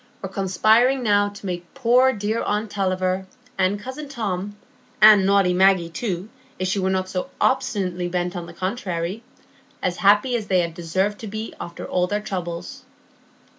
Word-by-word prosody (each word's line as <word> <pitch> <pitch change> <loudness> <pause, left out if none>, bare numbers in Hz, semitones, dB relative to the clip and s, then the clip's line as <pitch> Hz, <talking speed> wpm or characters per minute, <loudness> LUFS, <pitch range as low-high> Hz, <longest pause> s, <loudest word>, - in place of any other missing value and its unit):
were 195 - -4
conspiring 220 +7 +3
now 205 -2 +3
to 205 0 -12
make 175 -2 -5
poor 255 0 +4
dear 215 0 -2
aunt 210 0 -2
Tulliver, 185 -1 -1 0.3
and 190 +2 +1
cousin 260 +6 -7
Tom, 205 -6 -3 0.4
and 210 -3 +8
naughty 195 -2 +4
Maggie 185 -2 +3
too, 185 0 -3 0.3
if 185 - -2
she 190 +2 0
were 190 0 0
not 185 0 -2 0.2
obstinately 195 -9 0
bent 175 +1 -2
on 175 -1 -5
the - - -9
contrary, 185 0 -3 0.6
as 180 -1 -2
happy 210 +5 +4
as 220 -3 -3
they 180 -3 +2
deserved 185 +5 -2
to 220 - -7
be 215 +2 -5
after 170 - -7
all 180 0 0
their 205 +2 -1
troubles. 180 +4 -5
195 Hz, 160 wpm, -23 LUFS, 180-215 Hz, 0.6 s, and